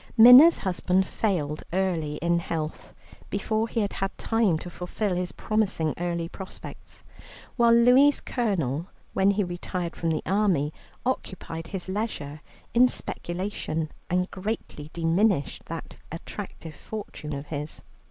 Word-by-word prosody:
Minna's 250 +9 +10
husband 185 0 +1
failed 160 -9 -1
early 170 -5 0
in 170 0 +3
health, 160 -2 -4 0.4
before 215 +2 0
he 230 0 -1
had 200 - -1
had 195 0 -3
time 225 -7 +2
to 175 - -7
fulfil 180 +3 -2
his 180 0 -2
promising 200 -8 0
early 170 -1 -1
prospects, 190 +2 -10 0.5
while 235 -2 +5
Louie's 250 +5 +6
Colonel, 175 - -1 0.3
when 190 +1 +3
he 200 +1 +2
retired 175 -1 -4
from 165 - -1
the 155 -1 -1
army, 185 -7 +2 0.3
occupied 170 -9 -3
his 190 -1 -5
leisure 185 -8 -3 0.3
in 245 +2 +7
speculation, 175 -7 -3 0.2
and 180 +1 0
greatly 185 -7 -5
diminished 170 0 +1
that 165 0 -7
attractive 165 -1 -7
fortune 200 -6 -7
of 140 +1 -5
his. 150 0 -5
180 Hz, 130 wpm, -26 LUFS, 165-215 Hz, 0.5 s, Minna's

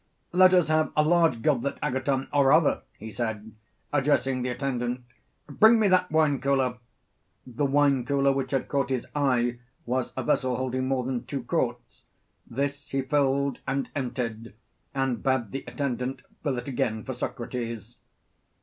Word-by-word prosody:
Let 185 +1 +6
us 180 -3 +4
have 155 0 +2
a 150 - +5
large 165 -7 +3
goblet, 140 -3 +1
Agathon, 130 +1 -1
or 140 -2 +4
rather, - - +4 0.2
he 110 - -8
said, 110 0 -4 0.4
addressing 135 -2 +2
the 125 - -1
attendant, 125 -1 -2 0.4
bring 220 +10 +5
me 215 - +4
that 185 -1 +3
wine 155 -3 +2
cooler. 130 -3 +1 0.7
The 130 +3 -1
wine 140 -2 +3
cooler 140 +1 +2
which 135 -1 -2
had 135 - -1
caught 140 -1 0
his 130 -3 -1
eye 125 -4 +1 0.3
was 125 +1 -1
a 130 - -1
vessel 130 -2 +1
holding 130 +1 -2
more 130 -1 0
than 125 -1 -3
two 140 -4 -4
quarts 120 -4 -3 0.4
this 140 +3 -3
he 135 0 -1
filled 140 -1 +1
and 135 +1 -2
emptied, 120 -5 -4 0.4
and 135 -3 0
bade 130 -6 0
the 135 - -4
attendant 130 -2 -3 0.2
fill 140 -5 -1
it 120 - -5
again 120 -5 -1
for 130 - -4
Socrates. 120 -2 -5
130 Hz, 160 wpm, -27 LUFS, 125-140 Hz, 0.7 s, Let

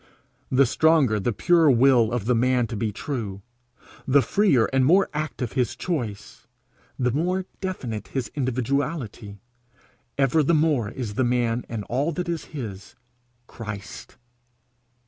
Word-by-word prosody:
The 135 +1 +4
stronger 140 -5 +3
the 110 +5 0
pure 165 - +3
will 125 -3 +4
of 120 -4 -2
the 125 - +2
man 125 +1 +2
to 115 - -6
be 110 0 -1
true; 105 -5 -5 0.6
the 135 +1 +4
freer 190 - +3
and 135 -1 +3
more 185 +8 +4
active 150 -5 -3
his 125 -3 -1
choice; 115 - -5 0.5
the 125 -1 +1
more 180 +7 -1
definite 125 - -4
his 130 -5 -4
individuality, 130 -4 -2 0.8
ever 140 +3 +3
the 160 +3 +2
more 150 -8 +2
is 115 -4 -5
the 130 - 0
man 120 -1 0
and 115 -3 -4
all 135 +10 -1
that 175 +2 -3
is 170 -2 -3
his, 110 - -8 0.5
Christ's. 105 -3 -9
125 Hz, 140 wpm, -24 LUFS, 115-150 Hz, 0.8 s, The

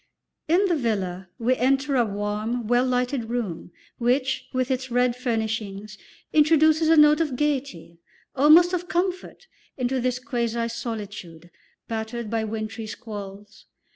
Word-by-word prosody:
In 350 +6 +3
the 355 -3 +2
villa 190 - -2
we 245 +2 +1
enter 270 +3 +1
a 245 - +4
warm, 210 +3 -3
well 245 +3 +2
lighted 250 0 0
room, 220 -9 -4 0.3
which, 255 +2 0
with 255 0 -1
its 260 0 -2
red 245 0 +2
furnishings, 220 -4 -3 0.4
introduces 315 +1 +4
a 325 - +5
note 300 +1 +6
of 300 -6 -1
gaiety, 260 - -3 0.4
almost 315 +6 +6
of 355 0 -2
comfort, 365 +6 -2 0.3
into 255 0 -1
this 250 0 0
quasi 235 -3 -2
solitude, 205 -8 -7 0.4
battered 225 0 -4
by 225 -1 0
wintry 220 0 -5
squalls. 205 -3 -9
245 Hz, 135 wpm, -24 LUFS, 215-280 Hz, 0.4 s, note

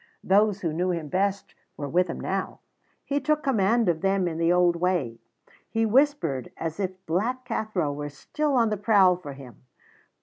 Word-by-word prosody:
Those 205 +1 +3
who 165 -3 -1
knew 180 +3 0
him 165 -4 -3
best 195 +4 -1 0.2
were 145 - -4
with 180 +5 +2
him 165 - -5
now. 195 0 -3 0.5
He 285 0 0
took 300 +2 0
command 230 -2 +2
of 165 -2 +1
them 195 -1 +1
in 165 -1 -4
the 165 +1 +3
old 175 -1 +4
way. 170 -10 -1 0.5
He 225 0 +1
whispered, 220 - +1
as 165 +2 -4
if 190 -1 -4
Black 235 +10 -1
Cathro 215 - -2
were 145 0 -5
still 290 - -2
on 230 -3 +3
the 210 - 0
prowl 200 -3 +4
for 160 -6 -9
him. 135 -3 -13
185 Hz, 180 wpm, -26 LUFS, 165-220 Hz, 0.5 s, old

